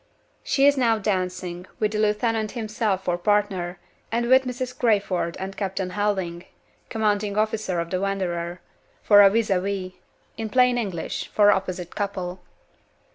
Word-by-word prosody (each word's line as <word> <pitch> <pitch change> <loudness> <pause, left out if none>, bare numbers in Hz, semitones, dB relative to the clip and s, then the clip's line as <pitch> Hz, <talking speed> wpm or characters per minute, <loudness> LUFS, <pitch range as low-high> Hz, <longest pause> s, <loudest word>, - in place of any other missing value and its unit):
She 275 - +2
is 285 0 +5
now 230 -3 +3
dancing, 185 -3 -3
with 210 -1 0
the 215 - -2
lieutenant 215 +1 0
himself 215 -4 -1
for 175 0 0
partner, 195 -3 0 0.3
and 235 +1 0
with 260 +1 +6
Mrs. 250 0 -4
Crayford 200 -8 0
and 190 +1 -5
Captain 190 -2 -3
Helding 185 -3 -2 0.4
(commanding 210 -2 0
officer 215 -4 0
of 170 0 -4
the 185 0 -1
Wanderer) 175 -3 -2 0.4
for 205 - +6
vis 220 0 0
a 185 - +3
vis 190 -1 -3 0.5
in 220 -1 -3
plain 250 0 +3
English, 185 -8 -4
for 205 -1 +5
opposite 185 -3 -2
couple. 190 -3 -3
205 Hz, 145 wpm, -24 LUFS, 185-220 Hz, 0.5 s, with